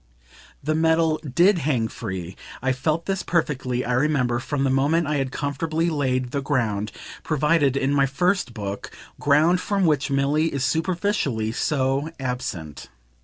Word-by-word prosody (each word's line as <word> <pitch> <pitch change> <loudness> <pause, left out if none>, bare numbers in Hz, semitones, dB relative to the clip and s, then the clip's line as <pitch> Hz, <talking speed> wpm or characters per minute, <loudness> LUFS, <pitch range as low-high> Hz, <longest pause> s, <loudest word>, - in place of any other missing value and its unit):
The 155 +2 0
medal 160 0 +2
DID 175 +7 +3
hang 130 -7 0
free 95 -4 -6 0.2
I 130 +1 0
felt 155 +6 -1
this 195 -1 -1
perfectly, 130 -7 -1
I 125 - -1
remember, 125 -3 +1
from 135 +2 -2
the 135 - +2
moment 145 +5 +2
I 150 0 0
had 135 -2 -1
comfortably 155 +4 -1
laid 130 -4 0
the 140 - -1
ground 115 -7 -1 0.3
provided 150 -2 +2
in 140 +1 +1
my 140 -1 +3
first 180 +2 0
Book, 100 -2 -5 0.3
ground 155 +5 +3
from 195 -1 0
which 150 -3 +2
Milly 140 +4 +1
is 135 -2 -1
superficially 160 - 0
so 135 +3 0
absent. 105 - -5
140 Hz, 150 wpm, -23 LUFS, 130-160 Hz, 0.3 s, DID